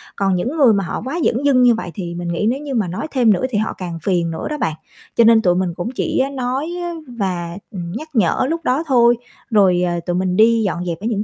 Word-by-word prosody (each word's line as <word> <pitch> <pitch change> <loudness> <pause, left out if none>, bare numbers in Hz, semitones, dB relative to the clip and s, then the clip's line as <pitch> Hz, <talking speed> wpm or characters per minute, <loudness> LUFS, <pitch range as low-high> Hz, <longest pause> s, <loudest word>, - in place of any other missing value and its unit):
Còn 195 -2 +1
những 250 - -2
người 260 -7 +6
mà 200 -1 +1
họ - - -4
quá 280 +7 -3
dửng 250 +5 +1
dưng 265 -3 +4
như 240 -2 +5
vậy 180 -6 -5
thì 175 -3 -5
mình 175 0 -5
nghĩ 170 +4 -1
nếu 265 - -1
như 285 -2 -5
mà 210 -5 +1
nói 180 - -4
thêm 240 -6 +4
nữa 195 - -1
thì 220 - -1
họ 215 +1 -1
càng 175 -3 -5
phiền 175 -4 0
nữa 160 - -4
đó 300 - -3
bạn, 160 - -1 0.4
cho 235 - +5
nên 225 -1 +6
tụi 180 -3 +2
mình 180 -2 -1
cũng 175 +6 -4
chỉ - - 0
nói 260 +4 -2 0.4
và, 185 -7 -3
ừ, 195 - -7 0.2
nhắc 310 - -7
nhở 215 0 +2
lúc 330 0 -2
đó 270 +6 +1
thôi, 240 -3 +5 0.3
rồi, 190 -5 +4
ờ, 175 0 -1
tụi 175 - -1
mình 185 0 0
đi 225 +1 +5
dọn 180 -2 -2
dẹp 170 -1 -3
ở 215 - -6
những 210 -3 -1
210 Hz, 260 wpm, -19 LUFS, 180-250 Hz, 0.4 s, người